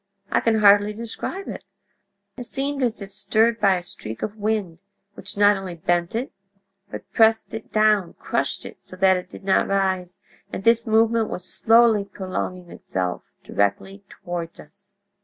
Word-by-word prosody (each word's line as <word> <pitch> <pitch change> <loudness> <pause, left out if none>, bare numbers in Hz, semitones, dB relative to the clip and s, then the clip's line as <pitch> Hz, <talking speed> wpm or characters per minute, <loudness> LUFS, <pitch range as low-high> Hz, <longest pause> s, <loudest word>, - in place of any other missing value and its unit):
I - - +3
can 220 -2 +1
hardly 205 0 +6
describe 235 - -6
it. - - -7 0.7
It 245 - -6
seemed 275 +2 -3
as 235 -4 -1
if 195 - -11
stirred 225 +4 +1
by 200 -2 +4
a 180 - -4
streak 110 -10 -7
of 215 - -3
wind, 205 -6 -2 0.3
which 205 - -9
not 205 0 +5
only 190 -2 -6
bent 175 +3 -1
it, 245 +4 -2 0.6
but - - -8
pressed 225 0 +3
it 220 -1 -7
down—crushed 215 -4 0
it - - -9
so - - -12
that 190 0 +4
it 180 - -7
did - - -12
not 190 0 +2
rise, 190 -2 -1 0.3
and - - -5
this 230 +1 +3
movement 225 0 +3
was 180 - -5
slowly 225 0 +4
prolonging 185 -2 -5
itself 90 -1 -3 0.2
directly 145 - -1
toward 175 -3 -6
us. 200 +5 -15
200 Hz, 160 wpm, -23 LUFS, 185-220 Hz, 0.7 s, hardly